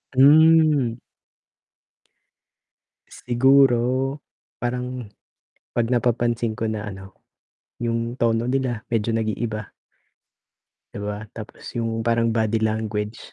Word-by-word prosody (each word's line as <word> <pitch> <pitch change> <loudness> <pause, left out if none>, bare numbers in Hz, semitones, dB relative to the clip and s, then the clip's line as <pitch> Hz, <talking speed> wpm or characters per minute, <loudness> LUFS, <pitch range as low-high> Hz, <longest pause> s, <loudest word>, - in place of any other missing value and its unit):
Hmm. 150 -3 +5 2.3
Siguro, 130 +1 +3 0.4
parang 125 +1 -4 0.7
'pag 120 0 +1
napapansin 120 -1 0
ko 110 - -3
na 110 -1 -3
ano, 95 -1 -10 0.7
yung 115 0 -1
tono 115 0 +2
nila 125 -3 -1
medyo 115 -1 0
nag-iiba. 110 -1 -3 1.2
'Di - - -6
ba, 105 0 -3 0.2
tapos 110 -2 -10
yung 115 -1 -2
parang 115 0 +2
body 110 0 +1
language, 110 0 -2
115 Hz, 90 wpm, -23 LUFS, 110-125 Hz, 2.3 s, Hmm